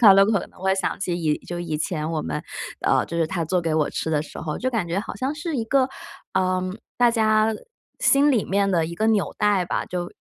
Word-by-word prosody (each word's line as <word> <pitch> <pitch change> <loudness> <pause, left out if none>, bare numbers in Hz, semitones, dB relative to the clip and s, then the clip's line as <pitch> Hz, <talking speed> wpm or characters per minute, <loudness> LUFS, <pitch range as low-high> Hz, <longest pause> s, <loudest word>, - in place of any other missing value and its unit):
她 200 - +11
都 195 0 +6
可 205 -4 +1
能 - - -20
会 190 0 +2
想 190 0 -2
起 180 -3 -1
以 155 -3 0
就 175 - -4
以 160 -3 -3
前 155 -1 -2
我 160 -2 -1
们， 75 - -3 0.4
呃， - - +2
就 170 - -5
是 165 -1 +2
她 170 +1 -2
做 170 +3 0
给 160 -1 0
我 155 -2 +2
吃 160 - -3
的 150 -2 +2
时 155 - -8
候， 155 -2 -4
就 255 - 0
感 225 -8 -1
觉 170 +3 -1
好 - - -7
像 265 +3 -2
是 320 -1 -3
一 230 - -1
个， 260 +3 +2 0.5
呃， 185 -1 +2 0.4
大 245 -1 +5
家 220 -1 +3 0.5
心 280 +2 +5
里 240 -7 +2
面 200 0 +1
的 170 -3 +2
一 170 +1 -5
个 220 +5 0
纽 215 -3 +1
带 205 -3 +3
吧， - - -2
就 175 -1 -4
190 Hz, 265 characters per minute, -24 LUFS, 165-220 Hz, 0.5 s, 她